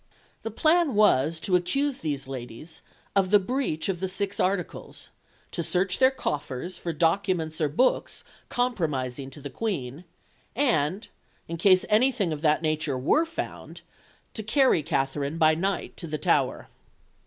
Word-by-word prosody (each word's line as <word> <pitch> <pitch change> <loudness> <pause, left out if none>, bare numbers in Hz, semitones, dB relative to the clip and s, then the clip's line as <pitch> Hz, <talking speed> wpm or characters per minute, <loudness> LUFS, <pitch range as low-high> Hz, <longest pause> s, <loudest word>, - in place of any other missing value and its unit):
The 225 - -4
plan 310 +4 +2
was 165 -7 +3
to 185 - +1
accuse 275 +10 0
these 145 -4 -3
ladies 130 +4 -8 0.3
of 195 -2 +3
the 205 - +7
breach 205 - -2
of 190 -3 -1
the 190 - -1
Six 195 +1 -3
Articles, 185 -2 -2 0.4
to - - -2
search 180 +3 0
their 260 - +7
coffers 150 - -4
for 170 0 -4
documents 165 0 0
or 150 - +2
books 250 - +1 0.3
compromising 145 - -1
to 135 - -11
the 140 -1 -7
Queen, 170 - -4 0.5
and, 205 - +1 0.4
in 165 - -4
case 185 +1 +4
anything 215 -5 +2
of 150 - -6
that 155 0 +2
nature 155 -3 0
were 305 - +2
found, 330 - -6 0.5
to 220 - -5
carry 240 - +3
Katherine 140 +2 -1
by 155 -1 +5
night 190 +5 -2
to 170 - -6
the 155 0 -3
Tower. - - +1
175 Hz, 150 wpm, -26 LUFS, 150-210 Hz, 0.5 s, the